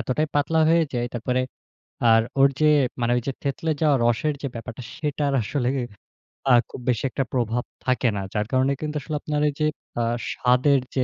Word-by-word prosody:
এতটাই 150 +5 0
পাতলা 145 +3 +2
হয়ে 165 0 +5
যায়, 120 -1 -1
তারপরে 125 +2 0 0.7
আর 115 - +6 0.2
ওর 135 - +8
যে 155 - +4 0.3
মানে 120 0 +1
ওইযে 130 +3 -2
থেতলে 145 +3 -1
যাওয়া 150 -2 +4
রসের 120 +6 +1
যে 140 - -2
ব্যাপারটা 115 +2 -7
সেটার 145 -2 -1
আসলেই 130 +3 -1 0.7
আ - - +8 0.2
খুব 125 - -9
বেশি 120 - +1
একটা 135 - -1
প্রভাব 120 -1 0 0.2
থাকে 130 -1 +2
না। 100 - -2
যার 105 -1 0
কারণে 130 +1 +2
কিন্তু 150 0 -3
আসলে 155 +2 -5
আপনার 150 -1 -1
এইযে 150 +2 -2 0.4
আ - - +1 0.3
স্বাদের 130 +3 +3 0.2
যে 130 - +2
135 Hz, 180 wpm, -24 LUFS, 120-150 Hz, 0.7 s, ওর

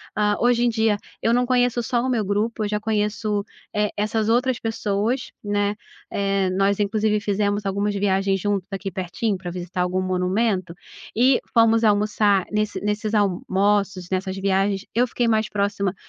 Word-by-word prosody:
Ah, 210 0 +2
hoje 240 0 +3
em 240 - +3
dia 220 -2 +1 0.3
eu 230 - +3
não 245 - +3
conheço 245 -1 +2
só 235 +1 0
o 260 - -1
meu 230 -4 +1
grupo, 215 +3 -1
eu 205 - -1
já 210 - -1
conheço, 210 -1 -1 0.3
eh, 210 0 +2
essas 215 +1 0
outras 245 +1 +2
pessoas, 225 +2 -1
né, 205 0 0 0.4
eh, 195 -1 0
nós 195 +2 +1
inclusive 210 +1 +1
fizemos 205 0 -1
algumas 200 +1 -1
viagens 195 -1 +1
juntos 200 -1 -1
aqui 195 0 -4
pertinho 185 +3 -2
para 180 -1 -6
visitar 180 0 -4
algum 180 +1 0
monumento, 185 0 0 0.4
e 250 +3 +4
fomos 230 -1 +4
almoçar 205 -2 +3
nesse 210 0 -1
nesses 210 +1 -2
almoços, 200 -1 +1
nessas 190 0 -1
viagens, 195 +1 0
eu 245 +2 +2
fiquei 240 0 -1
mais 220 -1 +1
próxima 200 -2 -1
205 Hz, 165 wpm, -23 LUFS, 195-220 Hz, 0.4 s, e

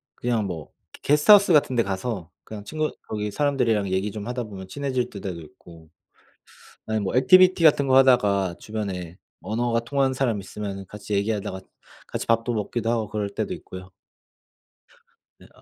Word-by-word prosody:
그냥 115 -4 -1
뭐 80 -5 -6 0.2
게 - - -13
게스트 150 +5 +2
하우스 200 -3 +7
같은 145 -4 +4
데 115 - +3
가서 95 -2 -4
그냥 105 -2 -8
친구 155 +5 -2 0.2
거기 105 -1 -3
사람들이랑 120 -9 +1
얘기 95 +3 -1
좀 105 +1 -7
하다 125 0 -3
보면 95 -3 -9
친해질 130 -3 -2
때도 100 -1 -6
있고 80 +1 -16 1.0
아니 110 0 -1
뭐 95 - -3
액티비티 185 +7 +6
같은 145 -2 +5
거 130 0 +5
하다가 100 -9 +3
주변에 95 -5 -5 0.2
언어가 115 +4 -1
통하는 135 +2 0
사람 125 -5 0
있으면은 100 0 -6
같이 105 +1 -8
얘기하다가 100 -1 -1 0.5
같이 - - -4
밥도 115 +1 +1
먹기도 110 +2 -2
하고 115 -3 -1
그럴 105 -1 -2
때도 - - -3
있고요. 95 0 -11 1.5
네 - - -18
아. - - -21
110 Hz, 355 characters per minute, -24 LUFS, 100-125 Hz, 1.5 s, 하우스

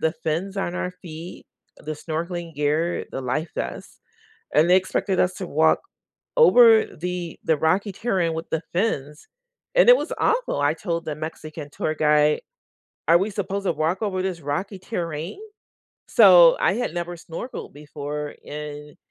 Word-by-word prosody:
the 160 0 +1
fins 180 +6 -2
on 180 -2 -2
our 180 - -2
feet, 165 0 -9 0.3
the 155 0 -6
snorkeling 165 +2 -5
gear, 150 +4 0
the 135 - -3
life 145 +6 -2
vests, - - -6 0.5
and 160 +4 +4
they 185 - +7
expected 185 0 0
us 180 +1 +2
to 185 - -6
walk 160 +1 +3 0.6
over 240 - +7
the 180 0 -5
the 160 - +2
rocky 185 +7 +1
terrain 185 -6 0
with 165 +1 -5
the 160 +1 -1
fins, 150 -7 -2 0.5
and - - +5
it - - +10
was - - -4
awful. 470 - +1
I 145 +2 +2
told 170 -1 -3
the 155 - -3
Mexican 155 -1 -7
tour 155 - -2
guide, 150 0 +3 0.7
"Are 170 +1 +7
we 200 +3 -1
supposed 200 0 -3
to - - +2
walk 160 +4 -1
over 185 -3 -1
this 185 -3 -3
rocky 180 +8 -3
terrain?" 170 - -5 0.7
So, 180 -6 +8
I - - +3
had 245 -5 -2
never 175 0 -4
snorkeled 170 +9 -8
before, 150 0 -6
and 150 0 -8
165 Hz, 160 wpm, -23 LUFS, 155-185 Hz, 0.7 s, it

